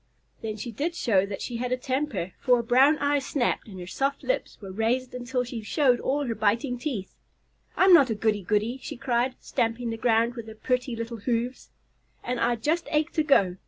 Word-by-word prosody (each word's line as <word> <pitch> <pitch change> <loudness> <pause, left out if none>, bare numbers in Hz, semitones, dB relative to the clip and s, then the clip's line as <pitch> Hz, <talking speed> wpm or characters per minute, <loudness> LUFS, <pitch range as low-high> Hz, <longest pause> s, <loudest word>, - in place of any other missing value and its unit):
Then 220 -1 -4
she 235 +3 -5
did 310 +10 -2
show 200 - +2
that 195 -1 -5
she 240 - -4
had 250 +1 -3
a 255 - +1
temper, 255 - -2
for 250 - +4
her 235 - 0
brown 265 +6 +5
eyes 285 -1 +1
snapped 265 -4 -1
and 190 -3 -9
her 180 - -6
soft 275 +9 -2
lips - - -2
were 195 -3 -8
raised 235 +5 0
until 250 0 -2
she 240 -2 -6
showed 245 +3 +2
all 285 +2 0
her 235 - -1
biting 230 +4 0
teeth. 240 -9 -4 0.6
"I'm 375 0 +6
not 280 -7 +7
a 225 - 0
'goody 210 -1 +1
goody,'" 215 +6 0
she - - -7
cried, 250 0 0
stamping 230 +1 -1
the 225 - -4
ground 230 +1 +2
with 235 -2 -8
her 220 - -9
pretty 250 +1 -1
little 230 +1 -5
hoofs, 240 +3 -2 0.5
"and 250 0 -2
I 240 +1 +2
just 310 +9 -1
ache 305 +1 +1
to 315 - +1
go. 195 - +3
245 Hz, 210 wpm, -26 LUFS, 225-265 Hz, 0.6 s, not